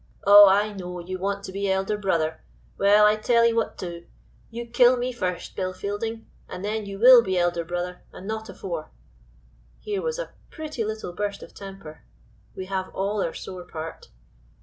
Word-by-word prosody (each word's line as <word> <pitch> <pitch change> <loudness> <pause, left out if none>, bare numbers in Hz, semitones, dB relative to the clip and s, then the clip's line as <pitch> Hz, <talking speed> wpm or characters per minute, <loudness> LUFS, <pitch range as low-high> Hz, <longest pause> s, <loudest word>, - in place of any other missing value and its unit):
Oh! 205 0 +10
I 205 +2 +2
know 180 -2 -6
you 185 +2 -6
want 200 +1 -2
to 190 - -7
be 200 +1 -2
elder 190 +2 0
brother. 170 -6 -1 0.3
Well, 205 +1 +5
I 210 0 +5
tell'ee 235 +1 +3
what 230 -1 -1
do; 170 -1 -7 0.4
you 235 +1 -6
kill 245 +1 +4
me 245 +1 -1
first, 180 -7 -4
Bill 185 -1 -2
Fielding, 220 +4 -4 0.2
and 185 +2 -6
then 215 0 -2
you 195 0 -6
will 245 +3 +9
be 190 -4 -1
elder 175 -1 +1
brother, 175 +1 -4
and 190 - -10
not 220 0 -4
afore." 170 -5 -6 0.9
Here 410 -2 -3
was 475 0 -2
a - - -6 0.2
pretty 305 -7 -5
little 215 -4 -5
burst 205 +1 -3
of - - -13
temper! 195 -6 -10 0.5
We 185 - -5
have 190 0 -3
all 200 +2 -1
our 165 - -2
sore 185 -1 -7
part. 160 -2 -8
200 Hz, 180 wpm, -25 LUFS, 180-220 Hz, 0.9 s, Oh